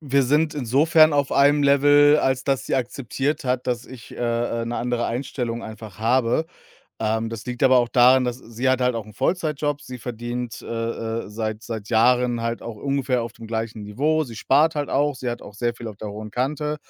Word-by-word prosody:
wir 140 -2 +2
sind 150 +4 +2
insofern 150 +4 +4
auf 140 -1 +1
einem 145 +1 +4
Level, 145 +1 +5
als 130 0 0
dass 135 -2 0
sie - - 0
akzeptiert 135 +4 -2
hat, 125 -1 -1
dass 120 -1 -2
ich, 125 -3 -12
äh, 115 -1 -1
äh, - - -4
'ne 120 - -3
andere 120 -1 -1
Einstellung 120 -1 -3
einfach 110 -2 -10
habe. 120 +6 +2 0.6
Ähm, 110 +1 0
das 115 +1 -7
liegt 125 0 -5
aber 130 -1 +6
auch 120 -1 +1
daran, 125 +2 +5
dass 125 0 -3
sie 120 +1 -3
hat 130 0 +2
halt 125 -1 +2
auch 110 -2 -5
'n 105 - -14
Vollzeitjob. 150 - -1
Sie 125 -3 -9
verdient, 120 0 -5
äh, - - -12
äh, 115 -1 -3
seit 110 0 -4
seit 110 -3 -6
Jahren 120 +1 +3
halt 115 0 -2
auch 115 -2 -7
ungefähr 135 -1 -1
auf 115 0 -6
dem 115 - -11
gleichen 110 -1 -4
Niveau. 150 +10 0
Sie 115 -4 -10
spart 150 +7 +3
halt 145 -1 -2
auch, 145 0 +1
sie 125 -1 -3
hat 120 - -5
auch 100 - -12
sehr 120 +2 -1
viel 120 -1 -7
auf 105 - -9
der 105 +1 -6
hohen 105 +1 -7
Kante. 150 +5 -2
125 Hz, 215 wpm, -23 LUFS, 115-140 Hz, 0.6 s, aber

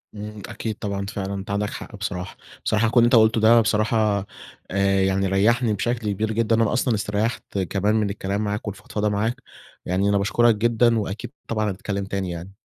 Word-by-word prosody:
إمم. 105 0 -7
أكيد 110 0 -4
طبعًا، 100 -2 -3
فعلًا 100 -1 -4
أنت 100 0 -5
عندك 105 +1 0
حق - - -8
بصراحة. 95 -2 -5 0.3
بصراحة 110 +1 +2
كلّ 120 - -1
اللي 120 - +6
أنت 120 - +4
قُلته 110 0 +5
ده 115 +1 +6
بصراحة 105 -1 +1 0.5
آآ، 100 0 +2
يعني 95 0 +1
ريّحني 110 +4 +2
بشكل 115 0 -1
كبير 110 +3 -1
جدًا 115 0 +2
لإن 115 - +2
أنا 110 - -1
أصلًا 125 -1 +1
استريّحت 105 +1 -2
كمان 100 +3 0
من 105 -2 +1
الكلام 100 0 -3
معاك 105 +1 -3
والفضفضة 105 +2 -3
معاك، 110 +5 -1 0.4
يعني 95 +3 +1
أنا 100 - +3
باشكُرك 115 +3 +3
جدًا 115 +1 +3
وأكيد 105 +4 -5 0.2
طبعًا 110 -2 0
هنتكلّم 100 +1 -4
تاني 95 -2 -3
يعني. 85 +3 -7
105 Hz, 190 wpm, -23 LUFS, 100-110 Hz, 0.5 s, اللي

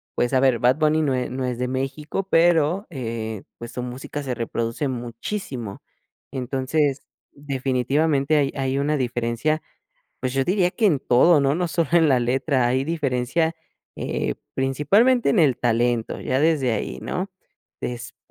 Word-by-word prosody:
pues, 120 +2 0
a 130 - +4
ver, 130 -3 +3
Bad 125 +2 +4
Bunny 155 0 +3
no 140 -4 +1
e 125 - -2
no 130 +1 -3
es 125 -1 -2
de 125 - 0
México, 140 +8 -3
pero, 170 +2 +3
eh, 115 - -5
pues, 120 0 -8
su 125 - -5
música 125 +4 -6
se 130 -3 -3
reproduce 115 +3 -2
muchísimo. 120 - -5 0.5
Entonces, 135 +2 0 0.3
definitivamente 140 +2 0
hay 140 -2 +2
hay 135 0 0
una 150 +2 +1
diferencia, 120 +4 -1 0.6
pues 130 - -2
yo 135 0 +2
diría 180 +1 +2
que 225 - -2
en 155 -9 +2
todo, 145 +6 +5
¿no? 140 0 +2
No 180 0 0
solo 165 -2 0
en 165 -2 +5
la 130 -3 +4
letra, 130 +1 +1
hay 130 +2 +1
diferencia, 160 +1 0 0.4
eh, - - -2 0.2
principalmente 195 - +3
en 205 - +3
el 140 -6 +3
talento, 120 -1 0
ya 130 - 0
desde 150 -4 +2
ahí, 65 - -3
¿no? 185 - -3 0.5
Después 120 0 -5
135 Hz, 160 wpm, -23 LUFS, 125-155 Hz, 0.6 s, todo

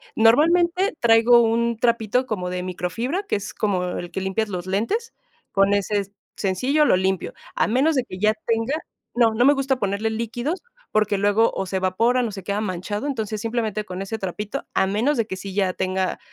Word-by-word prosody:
Normalmente, 340 - +4
traigo 235 +1 +6
un 235 0 +1
trapito 235 +1 +1
como 185 -7 -3
de 180 0 -3
microfibra, 205 - -3
que 395 - -1
es 200 -1 -5
como 190 -4 0
el 175 0 -6
que 190 - -3
limpias 190 +3 -1
los 180 -2 -4
lentes, 230 - -1 0.4
con 195 0 +3
ese 200 0 0 0.2
sencillo 255 +11 +1
lo - - +4
limpio, 190 0 -1 0.2
a - - +2
menos 270 +8 +2
de 260 - +2
que 185 -6 -9
ya 215 +1 +3
tenga 230 +5 0 0.4
no, 230 -2 +4
no 240 +3 +3
me 285 - +7
gusta 270 -1 0
ponerle 205 +1 -1
líquidos, 240 - -3 0.3
porque 210 -1 +2
luego 205 +3 +3
o 190 - -2
se 190 +1 -2
evaporan 230 +7 +1
o - - -5
se 195 -2 -8
queda 200 +3 -2
manchado, 205 +5 -3
entonces 220 -6 -3
simplemente 220 -2 -2
con 185 -1 -6
ese 220 +3 -5
trapito, 205 +7 -4
a - - +3
menos 220 +10 +1
de 230 - +1
que 200 - -5
sí 190 0 -8
ya 190 -2 +1
tenga 185 0 -1
215 Hz, 195 wpm, -23 LUFS, 190-240 Hz, 0.4 s, me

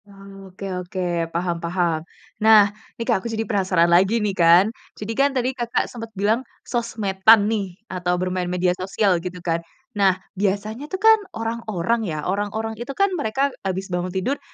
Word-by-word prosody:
Oh, 195 -1 -13
oke 185 +2 -9 0.2
oke. 180 +1 -7 0.3
Paham 170 0 -2
paham. 170 -2 0 0.4
Nah, 210 -2 +6 0.2
nih 230 - -4
Kak 230 -6 +1
aku 235 - -5
jadi 225 0 -2
penasaran 190 -6 +2
lagi 190 +6 +4
nih, 210 -3 0
kan. 170 +1 +6 0.3
Jadi 210 +2 -4
kan 275 +5 +3
tadi 260 -1 -1
Kakak 240 -2 -1
sempet 230 -2 -8
bilang 215 +5 +2 0.2
sosmed-an 220 -3 +3
nih 200 -5 -2
atau 180 -3 -2
bermain 180 0 -2
media 180 0 +1
sosial 185 0 0
gitu 180 0 -6
kan. 165 -1 0 0.3
Nah 200 -5 +3 0.2
biasanya 210 +7 -1
tuh 375 +6 -6
kan 445 0 +7 0.2
orang-orang 225 -1 -2
ya, 155 -3 -3
orang-orang 205 +3 -2
itu 245 +3 -6
kan 395 0 +2
mereka 280 -4 0
habis 190 0 -4
bangun 180 0 -1
tidur 190 +10 -2
200 Hz, 170 wpm, -22 LUFS, 180-225 Hz, 0.4 s, kan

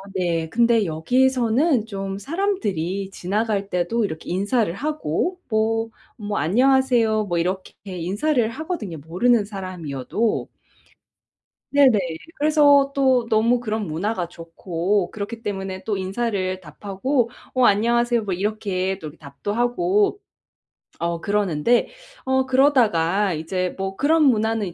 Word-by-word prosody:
네, 170 -3 0
근데 230 +1 +3
여기서는 250 - +2
좀 195 -3 -5
사람들이 200 - -2
지나갈 200 +2 -2
때도 180 +6 0
이렇게 160 -5 -6
인사를 200 +2 +1
하고 305 - -2
뭐, 225 +1 +1 0.3
뭐 210 -2 -3
"안녕하세요." 235 - +3
뭐 175 -3 -2
이렇게 185 +3 -2
인사를 205 - 0
하거든요, 270 - -5
모르는 205 - +2
사람이어도. 185 - -3 1.2
네네. 275 -5 +5 0.4
그래서 290 -2 +5
또 260 -3 +3
너무 230 +3 +3
그런 220 -3 -3
문화가 175 +3 -2
좋고 175 +3 -2
그렇기 220 +2 -6
때문에 195 -2 -4
또 210 -2 -2
인사를 190 -1 -2
답하고 205 - -2 0.2
"어, 255 -1 +3
안녕하세요." 235 +2 +3
뭐 195 -3 -2
이렇게 190 -1 -2
또 155 - -7
이렇게 150 +2 -12
답도 140 +5 -6
하고 360 - +1 0.8
어 170 0 -2
그러는데 205 +2 +1 0.4
어 265 0 +2
그러다가 210 - +3
이제 180 +3 -3
뭐 195 0 -3
그런 315 +2 +3
문화는 220 -7 +1
210 Hz, 280 characters per minute, -22 LUFS, 185-245 Hz, 1.2 s, 네네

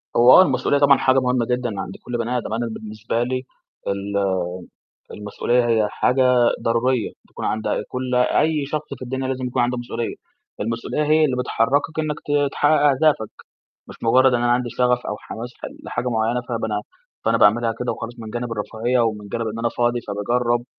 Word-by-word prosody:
هو 120 +2 +7
آه، - - +10
المسؤولية 140 -3 +2
طبعًا 140 -1 +6
حاجة 130 0 +3
مُهمّة 125 -2 +1
جدًا 125 -4 -2
عند 95 - -6
كل 120 -1 -3
بني 120 +2 -1
آدم، 115 - -4
أنا 120 +1 -1
بالنسبة 110 +1 -3
لي 130 +1 -2 0.4
الم 100 -1 -1 0.7
المسؤولية 120 +4 0
هي 110 -2 +2
حاجة 125 0 +2 0.3
ضرورية 115 0 +1
بتكون - - -9
عند 110 +1 -2
أ - - 0
كل 125 0 -3
أي 145 +4 +2
شخص 150 +1 -3
في - - -11
الدنيا 130 +1 -3
لازم 130 -1 -3
يكون 125 - 0
عنده 125 0 0
مسؤولية، 120 -1 -4 0.5
المسؤولية 115 +7 -2
هي 155 +1 +4
اللي 130 -4 +1
بتحركك 130 +5 0
إنّك 155 -1 -1 0.3
ت - - -19
تحقق 150 0 +3
أهدافك، 140 -6 +2 0.6
مش - - -10
مُجرّد 130 +2 +4
إن 120 - +1
أنا 120 0 +3
عندي 125 0 0
شغف 125 0 +1
أو 105 - -3
حماس 120 +2 -7
حل - - -8
لحاجة 125 - -3
معيّنة 115 +1 0
فب 115 -2 -2
أنا 105 -2 -1 0.4
فأنا - - +2
باعملها 115 +2 +4
كده 125 - -1
وخلاص 115 +1 -7
من 110 -1 -8
جانب 120 0 -4
الرفاهية 115 +3 -1
ومن 105 -3 -1
جانب 115 +2 -3
إن 110 +1 -4
أنا 115 0 +1
فاضي 120 +1 0
فباجرّب، 120 +4 0
120 Hz, 190 wpm, -22 LUFS, 115-130 Hz, 0.7 s, آه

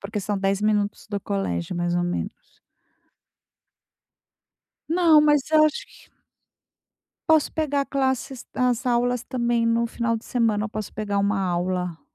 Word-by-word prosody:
Porque 205 +1 -4
são 200 +1 -2
10 195 +1 0
minutos 210 -1 0
do 205 -1 -2
colégio, 180 - -3
mais 175 0 -1
ou 175 - +1
menos. 175 0 -2 2.6
Não, 330 -2 +5
mas 295 -2 +4
eu 310 -1 +6
acho 310 -1 -1
que - - -20 1.2
posso 315 -3 +3
pegar 285 -3 0
classes 265 -2 -2
as 250 0 0
aulas 245 0 +1
também 240 -2 0
no 230 0 +2
final 230 0 -1
de 225 - -10
semana, 225 -4 0
eu 220 - -3
posso 215 -2 -6
pegar 205 -1 -2
uma 200 0 +1
aula. 180 -2 -2
225 Hz, 145 wpm, -24 LUFS, 200-260 Hz, 2.6 s, eu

